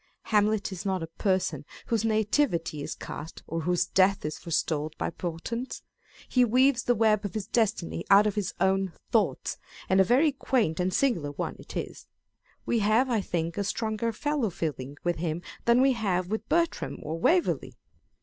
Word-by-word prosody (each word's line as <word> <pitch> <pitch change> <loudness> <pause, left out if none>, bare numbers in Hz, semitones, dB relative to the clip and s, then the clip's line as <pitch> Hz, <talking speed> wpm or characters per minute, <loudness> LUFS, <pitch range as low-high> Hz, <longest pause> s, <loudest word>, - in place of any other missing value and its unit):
Hamlet 210 0 +2
is 185 -2 -6
not 190 -3 -1
a 165 0 -9
person 185 -7 +1 0.2
whose 225 -2 0
nativity 215 - +1
is - - -4
cast, 155 +3 -8
or 165 0 -3
whose 175 +2 +1
death 190 -1 +2
is 150 - -4
foretold 155 -2 -1
by - - -2
portents: 180 +10 -5 0.4
he 250 - +3
weaves 255 +2 +3
the 245 - +3
web 215 -2 +3
of 205 - -5
his 210 -3 -2
destiny 205 -6 0
out 200 +1 +7
of 210 - +1
his 205 -3 -2
own 190 -1 +1 0.2
thoughts, - - 0 0.3
and 190 +1 +4
a - - +7
very 260 - +4
quaint 240 - 0
and 180 +1 +1
singular 185 - +1
one - - -3
it - - -8
is. - - -6 0.6
We 235 - +1
have, 220 +5 +3
I 225 -3 +2
think, 170 -1 -2
a - - +1
stronger 220 +2 -1
fellow 285 0 -1
feeling 145 -5 -4
with 175 -1 0
him 165 +1 -3 0.2
than 235 +2 +5
we 270 - +5
have 185 -6 -1
with 220 +1 -3
Bertram 335 0 0
or 160 +2 -4
Waverley. 345 - +1
200 Hz, 180 wpm, -28 LUFS, 170-230 Hz, 0.6 s, out